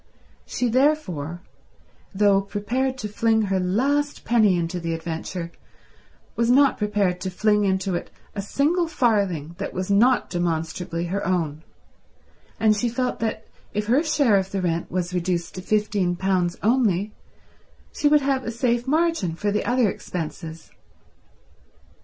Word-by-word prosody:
She 250 - -1
therefore, 225 - 0 0.7
though 200 -1 +3
prepared 235 +7 -2
to 215 - -4
fling 220 +1 +2
her 195 -2 0
last 275 +11 0
penny 215 -6 +4
into 170 +1 -2
the 165 -1 -2
adventure, 165 +1 -5 0.8
was 235 0 +1
not 275 +2 +4
prepared 205 -4 0
to 190 - -2
fling 210 +2 +2
into 190 0 0
it 175 - -3 0.2
a 200 - -3
single 310 - +1
farthing 200 - 0
that - - -4
was 185 +2 -2
not 240 +5 +4
demonstrably 170 0 -2
her 195 +3 -2
own; 160 -5 -1 1.0
and 215 -1 +4
she 235 +3 0
felt 250 +2 -2
that 220 -1 -2 0.3
if 210 0 0
her 250 +7 +3
share 285 -9 +3
of 190 0 -1
the 195 -1 -3
rent 170 -1 -1
was 180 0 -2
reduced 175 -1 -1
to 185 - -6
fifteen 205 -3 0
pounds 180 -1 0
only, 215 -4 +2 0.8
she 295 - +1
would 295 0 +5
have 270 -1 0
a - - -4
safe 235 +1 0
margin 310 - +1
for 205 +4 -1
the 210 - 0
other 245 -2 +3
expenses. 165 -3 -6
205 Hz, 145 wpm, -23 LUFS, 180-240 Hz, 1.0 s, would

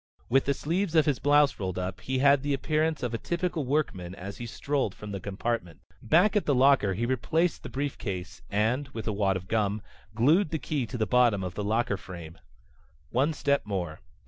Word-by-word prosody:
With 135 +2 +3
the 140 - +1
sleeves 170 +4 -1
of 155 -2 +5
his 145 -4 +1
blouse 145 0 +4
rolled 95 -2 -3
up 90 0 -4
he 130 0 -2
had 140 +1 +5
the 145 0 0
appearance 155 +2 0
of 120 -1 -2
a 115 - -2
typical 170 -4 -2
workman 95 -11 -1
as 100 +1 -7
he 120 - -6
strolled 135 -3 -1
from 105 -1 -8
the 100 - -4
compartment. 100 -2 -3 0.2
Back 180 - +4
at 210 - +1
the 145 - +3
locker 130 -7 +4
he 115 +5 -1
replaced 155 +7 0
the - - -8
briefcase 115 -10 -4
and, 115 +7 +1
with 110 - -5
a 110 - 0
wad 100 -2 +1
of 95 0 -9
gum, 105 -1 0 0.3
glued 155 - +4
the 160 - -1
key 145 -5 -2
to 125 - -5
the 110 - +1
bottom 115 -3 +3
of 90 -1 -4
the 105 - -4
locker 110 0 0
frame. 85 -4 -10 0.7
One 135 +6 +2
step 140 -2 +1
more. 90 -6 -3
120 Hz, 205 wpm, -28 LUFS, 100-145 Hz, 0.7 s, of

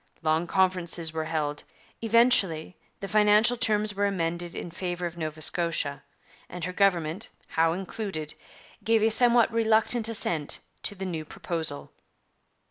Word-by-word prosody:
Long 160 +2 +1
conferences 180 -3 0
were 160 -1 -3
held. 150 -2 -3 0.4
Eventually 220 -8 +2 0.3
the 195 - -4
financial 210 +3 +4
terms 215 -3 +1
were 200 +1 0
amended 175 -2 -3
in 175 - -6
favour 175 0 -4
of 170 -1 -5
Nova 155 -2 -4
Scotia, 165 -4 0 0.5
and 180 -1 -7
her 180 +2 -3
government, 180 -1 0 0.2
Howe 165 0 +2
included, 185 -4 -5 0.5
gave 225 -1 +2
a 225 - +3
somewhat 235 0 +4
reluctant 225 0 +2
assent 165 -9 +2 0.2
to 205 - 0
the 190 0 -6
new 165 -4 -4
proposal. 160 - -3
180 Hz, 135 wpm, -27 LUFS, 160-210 Hz, 0.5 s, financial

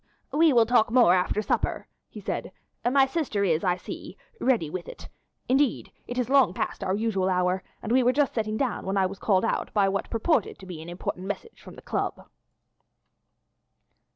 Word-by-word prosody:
"We 320 +1 +5
will 235 -3 +5
talk 235 -1 +3
more 235 -6 +5
after 185 +3 +1
supper," - - -1 0.2
he - - -10
said. - - -4 0.3
"My 265 +2 +4
sister 265 -8 -1
is, 165 -4 +1
I 180 -2 +2
see, - - -8 0.2
ready 240 -11 +2
with 175 +3 -6
it. - - -10 0.4
Indeed 270 0 +1 0.2
it 245 - -5
is 250 -2 0
long 260 -9 +4
past - - -3
our 190 0 0
usual 200 -3 0
hour, 180 0 +1 0.2
and 220 - -3
we 255 +2 +5
were 250 0 +4
just 285 +1 +1
sitting 215 -1 -1
down 250 -7 -2
when 195 +1 0
I 190 - +3
was 190 +1 -5
called 195 -1 +2
out - - -1
by 200 -2 +4
what 195 0 -2
purported 230 - 0
to 190 - -12
be 175 -4 -8
an 165 - -9
important 180 +1 -5
message 330 - -6
from - - -12
the - - -13
Club." - - -3
215 Hz, 195 wpm, -26 LUFS, 185-250 Hz, 0.4 s, We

